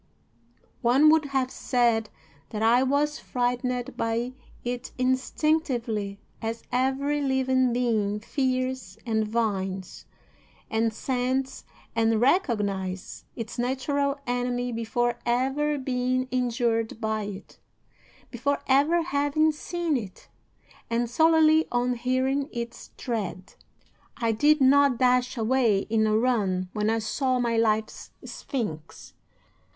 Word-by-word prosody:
One 270 +6 +5
would 315 -1 +3
have 265 -2 -1
said 235 -4 +1 0.4
that 215 0 -3
I 235 +3 +5
was 285 +3 +1
frightened 250 +1 -2
by 230 +2 -1 0.3
it 245 0 -4
instinctively, 255 -5 0 0.2
as 225 +1 -4
every 270 +3 0
living 260 -2 +2
being 220 -4 0
fears 255 -4 -2
and 220 -2 +1
divines, 195 -4 -3 0.6
and 225 +1 +1
scents 260 +3 -2 0.3
and 225 -1 +2
recognizes, 205 - 0
its 230 0 -6
natural 280 +3 0
enemy 245 0 -1
before 235 +1 -1
ever 270 +5 0
being 255 -1 -1
injured 235 -3 0
by 220 -2 -1
it, 200 0 -9 0.7
before 280 +4 0
ever 290 +6 +3
having 310 0 +2
seen 335 +1 -2
it, 205 -6 -9 0.6
and 235 0 -1
solely 320 +2 +4
on 245 +1 +1
hearing 260 +3 0
its 235 0 -6
tread. 195 -6 -4 0.6
"'I 230 -3 +1
did 295 +7 +3
not 275 -1 +5
dash 250 0 +2
away 225 -3 +2
in 220 -1 +3
a 215 0 +3
run 200 -7 0
when 210 0 0
I 225 - +2
saw 255 +4 0
my 235 -2 0
life's 220 -1 0 0.2
sphinx. 185 - -6
245 Hz, 115 wpm, -26 LUFS, 225-265 Hz, 0.7 s, One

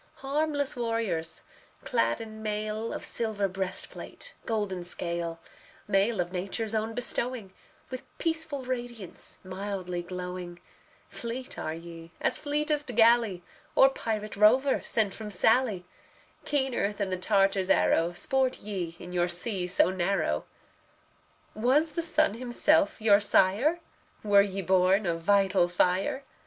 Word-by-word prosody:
Harmless 285 0 0
warriors, 225 -9 -2 0.4
clad 115 +1 +1
in 220 -1 -8
mail 215 +1 -3
Of - - -5
silver 215 -3 0
breastplate, 190 - -5
golden 205 -5 -2
scale; 170 -1 -3 0.5
Mail 205 +2 +2
of 175 0 -1
Nature's 200 +4 -3
own 220 +1 -1
bestowing, 240 -4 -2 0.4
With 255 - -5 0.2
peaceful 320 -4 -1
radiance, 240 -6 -5
mildly 185 -2 -4
glowing 180 0 -6 0.5
Fleet 240 +2 -6
are 155 - -3
ye 165 0 -10
as - - +1
fleetest 295 -3 -1
galley 225 -5 +4 0.3
Or 270 - +7
pirate 215 -4 -3
rover 250 +7 +4
sent 210 -4 +2
from 215 -1 -7
Sallee; 215 -1 +2 0.6
Keener 265 -7 0
than 200 -2 -3
the - - +1
Tartar's 195 0 +2
arrow, 170 -2 +3
Sport 260 +7 +1
ye 185 -5 -5
in 180 - -10
your 175 0 +2
sea 180 +1 -1
so 180 0 +3
narrow. 175 - 0 1.1
Was 265 +8 +2
the 335 - -2
sun 310 -5 +2
himself 255 +7 +2
your 210 -2 +5
sire? 210 - +3 0.4
Were 205 -1 +6
ye 195 -1 -2
born 190 +2 +3
of 165 -2 -1
vital 195 -1 +3
fire? 185 +10 +1
205 Hz, 125 wpm, -28 LUFS, 185-245 Hz, 1.1 s, Or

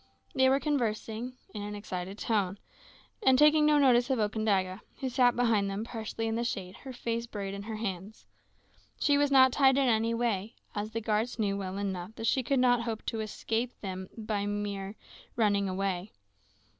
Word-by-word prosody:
They 260 -2 +4
were 270 +1 +3
conversing 240 -4 -2 0.2
in 210 - -5
an 210 0 -5
excited 190 -1 -5
tone, 205 -4 0 0.6
and 265 -10 +5
taking 300 +1 +6
no 300 -1 +5
notice 250 -3 +4
of 265 - +2
Okandaga, 205 -3 0 0.2
who 265 - -2
sat 245 -1 +3
behind 225 -5 +2
them, 195 +2 -3
partially 225 -1 -4
in 225 - -1
the 235 +1 -1
shade, 195 -6 -3
with - - -16
her 265 - -5
face 235 -1 -3
buried 200 -3 -5
in 200 - -5
her 220 +2 -5
hands. 200 -1 -5 0.7
She 285 - +3
was 290 0 +3
not 260 -1 +6
tied 265 0 +4
in 275 -1 +3
any 230 0 +2
way, 225 -3 -1 0.2
as 210 +1 -3
the 225 +1 -4
guards 220 +3 0
knew 205 -3 0
well 190 -1 -4
enough 195 0 -4
that 225 - -5
she 260 - +2
could 270 +3 0
not 245 -1 +4
hope 230 -2 -4
to 225 - -2
escape 225 +3 -3
them 190 -2 -5
by 215 -2 -2
mere 205 -1 -3 0.4
running 200 -4 +1
way. 195 0 -2
220 Hz, 190 wpm, -30 LUFS, 200-245 Hz, 0.7 s, taking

